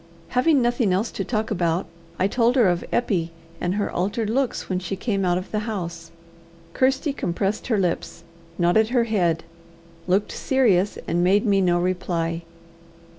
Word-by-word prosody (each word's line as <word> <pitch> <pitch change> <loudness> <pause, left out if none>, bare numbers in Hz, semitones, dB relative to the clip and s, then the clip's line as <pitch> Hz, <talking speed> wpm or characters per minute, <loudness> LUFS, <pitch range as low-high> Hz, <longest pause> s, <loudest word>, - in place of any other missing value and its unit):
Having 265 +1 +3
nothing 240 -4 +1
else 195 +5 0
to - - -3
talk 220 -2 -2
about, 175 -2 0 0.3
I 185 - +2
told 235 +3 +2
her 240 -6 +5
of 175 -1 0
Eppie, 185 -9 0 0.3
and 180 +2 0
her 205 -1 -1
altered 205 +4 -1
looks 265 +1 -1
when 185 -1 -1
she 185 +1 -4
came 195 0 -1
out 175 -1 +2
of 185 - -6
the 215 - 0
house. 170 -5 -5 0.6
Kirsty 265 +2 +1
compressed 195 -2 -2
her 225 -4 +1
lips, 180 -3 -2 0.3
nodded 175 +6 +3
her 245 -1 +3
head, 175 -8 +1 0.6
looked 190 +3 +1
serious, 210 -8 +2
and 175 +1 +1
made 200 +5 +3
me 200 -2 +3
no 175 -1 +2
reply. 175 -2 -1
195 Hz, 165 wpm, -23 LUFS, 175-230 Hz, 0.6 s, her